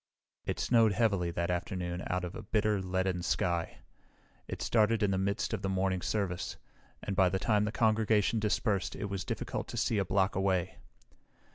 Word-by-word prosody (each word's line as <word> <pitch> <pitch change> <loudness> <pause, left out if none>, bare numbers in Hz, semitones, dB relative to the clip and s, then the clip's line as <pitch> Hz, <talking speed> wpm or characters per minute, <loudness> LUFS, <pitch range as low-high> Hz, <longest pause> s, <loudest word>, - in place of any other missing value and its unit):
It - - -2
snowed 115 -4 +4
heavily 100 -6 +1
that 85 +1 -1
afternoon 90 0 -3
out 90 0 -1
of 90 - -6
a - - -6
bitter, 105 -1 +1
leaden 95 -1 -1
sky. 85 -1 -1 0.7
It - - -5
started 115 -1 +3
in 100 - +2
the 95 - +1
midst 100 +2 -1
of - - -2
the 95 - -1
morning 95 -1 0
service, 95 -4 -2 0.5
and 100 - -3
by 95 -1 +4
the 95 - 0
time 105 +1 +2
the 105 - -2
congregation 110 -1 +2
dispersed 105 -2 0
it 100 -1 -4
was 95 -2 -2
difficult - - -4
to - - -6
see 110 - +1
a - - +2
block 95 0 +1
away. 95 -2 0
95 Hz, 180 wpm, -31 LUFS, 90-105 Hz, 0.7 s, snowed